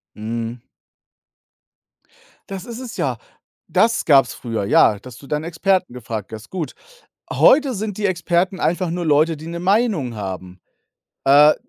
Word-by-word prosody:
Mhm. 115 +2 -4 1.9
Das 195 -2 -6
ist 235 0 -7
es 255 -3 -7
ja. - - -1 0.5
Das 230 +1 +2
gab's 140 -4 +5
früher, 115 -4 -4
ja, 100 +1 +4
dass 125 -2 -12
du 140 - -14
dann 150 +2 -2
Experten 180 0 0
gefragt 110 -3 -6
hast, 110 -1 -9
gut. 175 -5 -4 0.6
Heute 275 -2 +4
sind 210 -1 -4
die 210 - -1
Experten 180 +1 0
einfach 175 +1 0
nur 175 +1 -3
Leute, 155 +2 +3
die 155 +2 -10
'ne 170 0 -5
Meinung 190 - +1
haben, 95 -2 -6 0.6
äh, 145 +2 +7
160 Hz, 145 wpm, -20 LUFS, 120-190 Hz, 1.9 s, äh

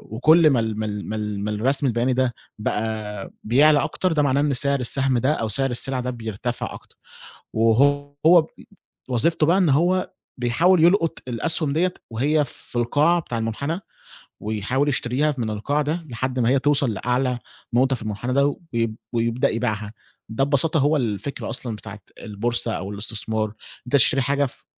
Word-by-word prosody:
وكل 155 +5 +5
ما 130 -4 +2
ال 110 -1 -2
ما 110 - -1
ال 105 -1 -5
ما 110 - -3
ال 105 -1 -3
ما 105 - -2
الرسم 135 +6 +1
البياني 120 +2 +1
ده 130 -2 +1 0.3
بقى 105 -2 -3
بيعلى 145 +6 +4
أكتر، 185 -2 -1
ده 150 - +2
معناه 140 0 +2
إن 145 -1 +1
سعر 140 +1 +1
السهم 130 +1 0
ده 130 +6 +2
أو 115 -6 -2
سعر 135 +5 +3
السِلَع 130 +2 -2
ده 125 0 -3
بيرتفع 115 0 -4
أكتر. - - -14 0.6
وهو 145 +8 +3
ب 155 - -10 0.6
وظيفته 155 +6 +2
بقى 175 +4 +3
إن 180 -6 +3
هو 175 +6 +2 0.3
بيحاول 160 +9 +3
يلقُط 170 -2 +3
الأسْهُم 145 +4 +2
ديّة 180 +3 +1 0.2
وهي 145 +6 +1
في 125 - -7
القاع 145 +9 +2
بتاع 120 -7 -5
المُنحنى 140 - -3 0.6
ويحاول 110 +7 -1
يشتريها 135 +3 0
من 115 -3 -2
القاع 140 +8 -1
ده 160 +3 -3
لحد 130 +2 -3
ما 120 0 +2
هي 135 0 +3
توصل 140 -3 +2
لأعلى 125 +3 -1 0.3
نقطة 130 +2 +3
في - - -9
المُنحنى 110 +4 -3
ده، 140 +1 +2 0.2
ويب 115 -2 -1 0.2
ويبدأ 115 +1 +1
يبيعها. 110 -1 -3 0.4
ده 110 +5 0
ببساطة 145 +3 +2
هو 150 +2 +3
الفكرة 120 +2 -3
أصلًا 115 -4 -4
بتاعة 105 0 -10 0.2
البورصة 115 +2 -2
أو 95 +2 -4
الاستثمار، 110 0 -1 0.3
أنت 125 - 0
تشتري 135 +1 +4
حاجة 140 +2 +1
ف 125 - -10
125 Hz, 170 wpm, -22 LUFS, 110-145 Hz, 0.6 s, وكل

